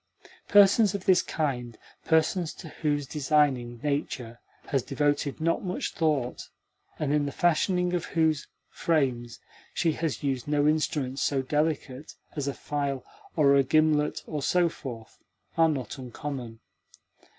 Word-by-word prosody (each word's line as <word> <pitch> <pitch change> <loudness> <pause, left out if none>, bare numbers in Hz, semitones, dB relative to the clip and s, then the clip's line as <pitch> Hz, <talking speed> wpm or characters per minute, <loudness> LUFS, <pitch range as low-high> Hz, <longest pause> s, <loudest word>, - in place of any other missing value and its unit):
Persons 205 0 +6
of 195 - -5
this 185 -2 +5
kind 125 -7 -3 0.3
persons 160 +1 +1
to 165 - -10
whose 145 -2 -1
designing 135 -4 +1
nature 130 -5 -3 0.3
has 135 -4 +1
devoted 145 +2 -1
not 165 +1 0
much 185 -1 -3
thought, 145 -6 -1 0.5
and 150 -2 -1
in 145 -1 +2
the - - -3
fashioning 180 +3 +1
of 175 - -1
whose 160 -3 +1 0.2
frames 130 -7 0 0.4
she 165 -1 +2
has 155 -2 -3
used 135 -3 -1
no 145 0 +2
instruments 145 -3 0
so 135 -2 +1
delicate 150 -1 -2 0.2
as 145 -2 -2
a 140 - -1
file 140 -3 -3 0.3
or 140 -3 +5
a 140 - +6
gimlet 150 +1 +2
and 150 -3 -4
so 175 +2 +3
forth 115 -8 -9 0.4
are 165 -1 +5
not 135 -3 -4
uncommon. 125 -2 -6
145 Hz, 140 wpm, -27 LUFS, 135-160 Hz, 0.5 s, Persons